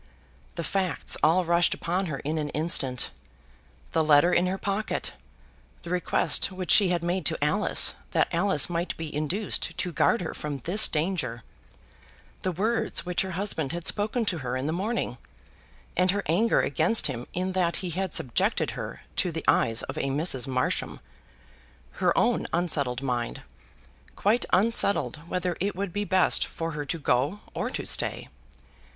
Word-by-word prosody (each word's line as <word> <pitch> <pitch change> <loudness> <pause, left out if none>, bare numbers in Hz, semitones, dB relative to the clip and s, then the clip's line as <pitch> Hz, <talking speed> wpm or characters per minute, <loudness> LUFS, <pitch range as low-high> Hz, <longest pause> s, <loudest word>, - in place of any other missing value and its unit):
The 170 - -3
facts 190 0 0
all 175 +3 +3
rushed 170 +1 +3
upon 180 +3 -2
her 150 -4 -3
in 155 +2 -2
an 150 -1 -3
instant; 135 -6 0 0.8
the 160 - +2
letter 155 +3 +5
in 175 +1 +3
her 190 +1 -2
pocket; 200 +2 -3 0.7
the 170 - -7
request 180 +2 +1
which 185 -1 -2
she 200 -4 +7
had 175 -2 0
made 175 +2 -1
to 160 - 0
Alice, 195 +8 +3 0.2
that - - +2
Alice 170 -3 +3
might 175 0 -3
be 160 -2 -6
induced 175 +8 -2
to 180 - -2
guard 235 +6 +2
her 170 - -4
from 150 -2 -4
this 180 - +2
danger; 150 -8 -2 1.0
the 185 - -1
words 220 +7 0
which 180 0 0
her 190 -1 -4
husband 165 -8 -1
had 175 -1 -5
spoken 220 +3 +2
to 180 -5 0
her 125 -2 -3
in 130 - -3
the 155 - -1
morning, 190 - -2 0.8
and 180 +1 +2
her 200 +2 +1
anger 200 +9 +2
against 230 -1 +1
him 125 -4 -3
in 185 +1 -2
that 180 -2 0
he 175 - -3
had 185 0 -2
subjected 125 - +1
her - - -7 0.2
to - - +1
the - - -5
eyes 115 0 +2
of - - -6
a - - -1
Mrs. 135 -2 +1
Marsham; 130 -1 -1 1.0
her - - +4
own - - +2
unsettled 140 -7 +1
mind 120 -3 -3 0.7
quite 220 +4 +2
unsettled 200 -4 +2
whether 180 -1 -1
it 200 +1 -1
would 195 -2 -4
be 205 0 -2
best 190 -2 +3
for 165 0 -5
her 150 -1 -5
to 165 - -2
go 145 +6 0
or - - -2
to - - -4
stay! - - +1
175 Hz, 170 wpm, -26 LUFS, 150-190 Hz, 1.0 s, she